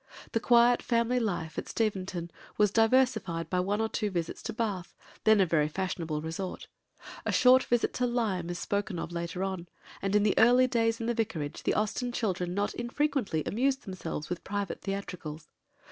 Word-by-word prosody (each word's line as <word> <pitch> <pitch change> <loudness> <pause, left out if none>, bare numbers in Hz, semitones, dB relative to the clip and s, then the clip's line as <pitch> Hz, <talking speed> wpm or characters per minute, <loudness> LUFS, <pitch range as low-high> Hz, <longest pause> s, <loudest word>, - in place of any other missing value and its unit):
The 230 - +1
quiet 240 +1 +5
family 235 +1 +1
life 175 -8 -2
at - - -7
Steventon 185 -6 -2 0.3
was 210 -2 +4
diversified 225 -8 +2
by 180 - +2
one 200 +3 0
or 225 - +1
two 215 -1 -1
visits 170 -4 -3
to - - -4
Bath, 210 -6 -3 0.3
then 220 -1 +6
a 190 - +5
very 155 -3 +2
fashionable 165 -3 -3
resort; 165 +4 -5 0.6
a - - -1
short 255 +1 +6
visit 240 -1 +1
to 250 - 0
Lyme 210 -8 -1
is 175 - -3
spoken 200 0 -2
of 165 - -4
later 170 +2 -3
on; 190 -3 -3 0.3
and 195 +1 0
in 210 - +4
the 210 - +3
early 245 +3 +6
days 230 -2 +1
in 230 - -3
the 240 - +1
vicarage 195 -11 -3
the - - 0
Austen 215 +4 -1
children 185 -6 -1
not 205 +1 0
infrequently 240 - -1
amused 265 +5 0
themselves 170 -5 -5
with 180 -1 -4
private 200 0 -3
theatricals. 180 -6 -5
200 Hz, 180 wpm, -29 LUFS, 175-230 Hz, 0.6 s, then